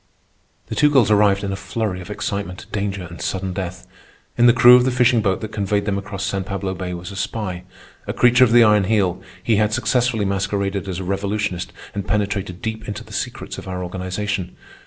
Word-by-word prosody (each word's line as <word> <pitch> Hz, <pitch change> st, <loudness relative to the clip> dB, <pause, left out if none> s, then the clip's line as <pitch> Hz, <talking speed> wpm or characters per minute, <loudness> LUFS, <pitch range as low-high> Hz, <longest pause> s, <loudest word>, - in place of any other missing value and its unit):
The -, -, -6 dB
two 150 Hz, -, +4 dB
girls 130 Hz, -7 st, +4 dB
arrived 100 Hz, -1 st, +4 dB
in 100 Hz, -, -2 dB
a -, -, -2 dB
flurry 95 Hz, 0 st, -3 dB
of 90 Hz, -, -10 dB
excitement, 100 Hz, -3 st, -4 dB
danger, 100 Hz, -2 st, -2 dB
and 85 Hz, 0 st, -9 dB
sudden 95 Hz, -1 st, -2 dB
death. 90 Hz, -1 st, -5 dB, 0.5 s
In 120 Hz, 0 st, +5 dB
the -, -, +8 dB
crew 125 Hz, 0 st, +8 dB
of 125 Hz, -, +5 dB
the 130 Hz, -, +2 dB
fishing 125 Hz, -2 st, +3 dB
boat 95 Hz, -3 st, 0 dB
that 110 Hz, -1 st, -5 dB
conveyed 100 Hz, -1 st, -1 dB
them 100 Hz, -1 st, 0 dB
across 95 Hz, 0 st, -6 dB
San 95 Hz, -1 st, -2 dB
Pablo 95 Hz, 0 st, -3 dB
Bay 90 Hz, -1 st, -5 dB
was 90 Hz, +2 st, -7 dB
a -, -, -8 dB
spy. 95 Hz, -3 st, -4 dB, 0.4 s
A -, -, -1 dB
creature 125 Hz, +1 st, +5 dB
of 120 Hz, -, +4 dB
the 120 Hz, 0 st, +7 dB
Iron 105 Hz, -2 st, +4 dB
Heel, 95 Hz, -3 st, +1 dB, 0.2 s
he 110 Hz, -3 st, +2 dB
had 105 Hz, 0 st, +2 dB
successfully 120 Hz, -1 st, +1 dB
masqueraded 100 Hz, 0 st, -1 dB
as 90 Hz, -, -3 dB
a 95 Hz, -, -4 dB
revolutionist 100 Hz, -1 st, -2 dB, 0.2 s
and 100 Hz, -1 st, -4 dB
penetrated 100 Hz, -3 st, -2 dB
deep 110 Hz, -1 st, -4 dB
into 105 Hz, -, -5 dB
the -, -, -14 dB
secrets -, -, -4 dB
of -, -, -11 dB
our 90 Hz, -1 st, -4 dB
organization. 95 Hz, +1 st, -3 dB
100 Hz, 210 wpm, -21 LUFS, 95-110 Hz, 0.5 s, the